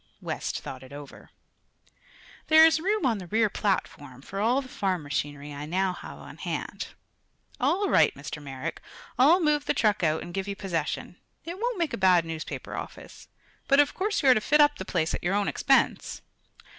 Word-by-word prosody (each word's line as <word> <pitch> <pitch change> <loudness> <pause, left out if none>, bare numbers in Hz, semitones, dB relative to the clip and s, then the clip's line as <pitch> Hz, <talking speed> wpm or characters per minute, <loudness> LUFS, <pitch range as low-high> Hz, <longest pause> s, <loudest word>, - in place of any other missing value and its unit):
West - - -4
thought 130 - -8
it 130 0 -13
over. 145 -1 -11 1.2
"There 315 0 +8
is 320 0 +4
room 395 0 0
on 230 -5 +1
the 180 - -9
rear 220 +2 +2
platform, 145 -9 -2
for 195 - -6
all 235 +6 +2
the 270 - -6
farm 190 -9 -2
machinery 145 0 -4
I 145 +1 -6
now 185 +3 0
have - - -9
on - - -12
hand. - - -4 0.7
All 400 +3 +1
right, 160 - +4
Mr. 145 +2 -7
Merrick; 135 -2 -6 0.4
I'll 310 +8 +6
move 300 -3 +1
the - - 0
truck 215 -3 +2
out 160 -2 +1
and 175 - -9
give 195 +1 -3
you 200 - -3
possession. 190 -4 -3 0.3
It 345 +3 -6
won't 480 -1 -1
make 335 -3 -1
a - - -2
bad 185 -3 +4
newspaper 160 -1 -6
office. - - -9 0.4
But 275 0 +4
of 290 - +4
course 405 -2 -1
you 270 - +5
are - - +9
to 215 - 0
fit 300 +7 +3
up 295 0 +5
the - - -5
place 165 -3 -1
at - - -4
your 180 +3 +1
own 205 -1 +1
expense." - - +1
195 Hz, 195 wpm, -27 LUFS, -, 1.2 s, are